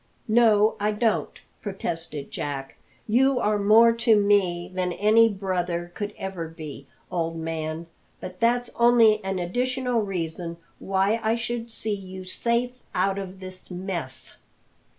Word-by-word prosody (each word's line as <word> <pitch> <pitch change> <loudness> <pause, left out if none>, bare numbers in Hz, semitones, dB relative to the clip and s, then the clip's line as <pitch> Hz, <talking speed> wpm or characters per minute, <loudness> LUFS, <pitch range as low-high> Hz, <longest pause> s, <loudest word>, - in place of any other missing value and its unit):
"No, 220 -2 +4
I 210 +1 +1
don't," 220 0 0 0.2
protested 165 -7 -4
Jack; 135 -2 -4 0.3
"you 260 +4 +3
are 210 -2 +1
more 225 +3 +6
to 230 -1 +3
me 190 -4 +2
than 180 -1 -1
any 220 +4 +5
brother 180 -3 -2
could 205 +2 -5
ever 190 -4 -5
be, 155 -4 -9 0.2
old 165 -2 -2
man; 160 0 -4 0.3
but 180 0 -8
that's 240 +1 +1
only 230 -3 +5
an 190 0 -2
additional 250 +6 0
reason 170 -3 -4 0.2
why 195 +3 +1
I 220 +1 +1
should 235 0 -4
see 220 -1 -2
you 190 -1 -7
safe 235 +6 0 0.2
out 190 +2 +1
of 190 -1 -7
this 185 0 -9
mess. 180 -7 -6
195 Hz, 135 wpm, -25 LUFS, 175-225 Hz, 0.3 s, more